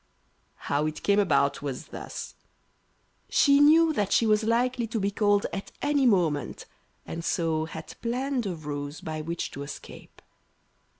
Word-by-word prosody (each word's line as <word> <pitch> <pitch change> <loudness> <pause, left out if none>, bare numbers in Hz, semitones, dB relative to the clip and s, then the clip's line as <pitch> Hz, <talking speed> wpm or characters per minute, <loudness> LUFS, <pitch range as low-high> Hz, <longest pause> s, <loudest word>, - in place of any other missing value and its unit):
How 145 +2 +1
it 155 0 -6
came 200 0 +3
about 140 -8 +2
was 140 -3 -5
thus: - - -7 1.0
She 280 -1 +5
knew 315 +2 +6
that 205 -8 -1
she 230 - +4
was 215 0 +3
likely 240 +1 +1
to 225 0 -2
be 200 0 0
called 205 0 +2
at 195 - -5
any 285 -2 +2
moment, 170 -9 +1 0.4
and 165 0 -6
so 160 -2 0
had 160 -1 -8
planned 250 0 -1
a 180 - -3
ruse 145 -1 -5
by 155 -1 -5
which 170 +2 -4
to 140 - -7
escape. 140 0 -10
200 Hz, 155 wpm, -27 LUFS, 155-235 Hz, 1.0 s, knew